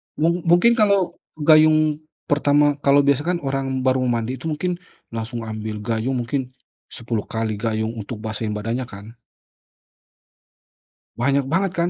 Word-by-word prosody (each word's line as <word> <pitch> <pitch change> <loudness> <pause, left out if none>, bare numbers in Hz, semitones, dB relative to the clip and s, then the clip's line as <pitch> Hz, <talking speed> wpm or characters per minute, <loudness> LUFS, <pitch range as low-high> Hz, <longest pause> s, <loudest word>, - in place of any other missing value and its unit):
Mung 170 +2 +1
mungkin 230 +8 +5
kalau 200 -4 +3 0.3
gayung 155 -1 +5 0.3
pertama 145 0 +2
kalau 140 0 +4
biasa 140 0 +3
kan 180 -1 +1
orang 135 -1 -2
baru 130 0 +2
mandi 120 +1 -1
itu 160 - -6
mungkin 175 +3 -2 0.3
langsung 115 +1 -5
ambil 110 -1 -5
gayung, 115 +3 -1
mungkin 130 +1 -3 0.4
10 115 -3 -4
kali 110 -2 -3
gayung 110 0 -1
untuk 105 +1 -7
basahin 110 -1 -3
badannya 115 +4 -3
kan? 105 +3 -11 2.0
Banyak 135 +2 +1
banget 185 +5 +1
kan, 170 +1 +2
130 Hz, 135 wpm, -22 LUFS, 115-155 Hz, 2.0 s, mungkin